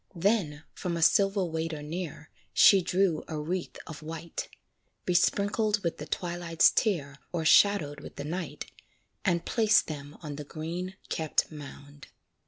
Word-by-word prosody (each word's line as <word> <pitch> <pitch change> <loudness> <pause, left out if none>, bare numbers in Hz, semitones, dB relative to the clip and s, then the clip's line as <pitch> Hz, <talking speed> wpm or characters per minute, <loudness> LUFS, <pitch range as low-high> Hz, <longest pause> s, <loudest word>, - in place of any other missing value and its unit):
Then, 170 -5 +1
from 175 -2 -3
a 165 - +1
silver 195 +2 +4
waiter 160 -2 -3
near, 160 0 -6 0.2
She 195 -2 +7
drew 180 -2 +1
a 160 - -4
wreath 175 +4 -3
of 155 -2 -9
white, 165 +1 -6 0.6
Besprinkled 205 +4 +2
with 170 - -2
the - - -6
twilight's 175 -2 +2
tear, 150 -10 0 0.2
O'ershaded 160 -2 +4
with - - -10
the 140 - -5
night, 170 +1 -4 0.6
And 170 -2 +1
placed 220 -1 +4
them 145 -2 -7
on 145 -2 -6
the 150 - -5
green 170 +5 -5
kept 160 0 0
mound. 145 -1 -11
165 Hz, 140 wpm, -29 LUFS, 155-185 Hz, 0.6 s, She